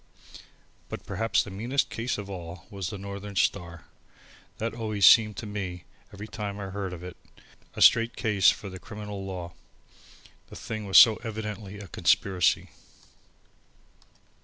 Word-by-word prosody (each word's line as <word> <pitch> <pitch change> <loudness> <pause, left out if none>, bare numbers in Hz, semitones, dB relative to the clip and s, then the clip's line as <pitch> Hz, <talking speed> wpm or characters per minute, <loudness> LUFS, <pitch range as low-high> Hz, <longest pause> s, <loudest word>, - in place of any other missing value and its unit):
But - - -7
perhaps 115 0 0
the 100 - -9
meanest 120 +8 -1
case 120 +2 -2
of 105 -1 -6
all 85 -3 -8
was 95 -3 -4
the 105 - -6
Northern 100 +1 -7
Star. 85 -5 -1 0.7
That 115 +1 -3
always 110 -3 0
seemed 110 -3 +7
to - - -5
me, 95 -4 -5 0.3
every 105 +1 -8
time 105 -2 -5
I 95 -1 -6
heard 100 -1 -4
of 90 -1 -8
it, 90 -1 -8 0.6
a - - +3
straight 115 -1 +5
case 105 -4 +3
for 100 - -2
the 95 -1 -8
criminal 105 -1 -7
law. 90 -3 -6 1.0
The - - -11
thing 110 -2 -6
was 95 - +5
so 110 -2 +9
evidently 105 -3 -6
a 100 -1 -9
conspiracy. 90 0 +2
100 Hz, 150 wpm, -27 LUFS, 95-110 Hz, 1.0 s, so